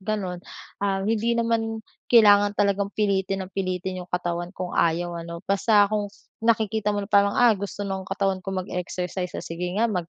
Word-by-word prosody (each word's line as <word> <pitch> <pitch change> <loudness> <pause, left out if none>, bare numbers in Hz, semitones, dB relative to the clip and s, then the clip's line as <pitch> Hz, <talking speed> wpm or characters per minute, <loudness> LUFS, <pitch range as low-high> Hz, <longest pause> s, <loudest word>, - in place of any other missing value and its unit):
gano'n. 190 -3 -3 0.4
Ah, 195 -1 0
hindi 225 +2 +1
naman 225 -1 0 0.3
kailangan 205 -3 +6
talagang 200 0 +1
pilitin 195 -2 0
ng 190 - -14
pilitin 185 -1 -3
'yong 180 - -10
katawan 175 -1 -2
kung 180 -1 -4
ayaw 170 +1 +1
ano 170 0 -7
basta 205 +1 +4
kung 205 -1 0 0.3
nakikita 220 -2 +1
mo 205 - -2
na 200 - -12
parang, 200 0 +5
"ah 245 -2 +6
gusto 200 0 -5
ng 190 -1 -4
katawan 195 -1 0
ko - - -6 0.2
mag-exercise 180 0 -4
o - - -4
sige 175 +2 -4
nga 225 - +3
mag 180 -6 -2
195 Hz, 180 wpm, -24 LUFS, 180-210 Hz, 0.4 s, kailangan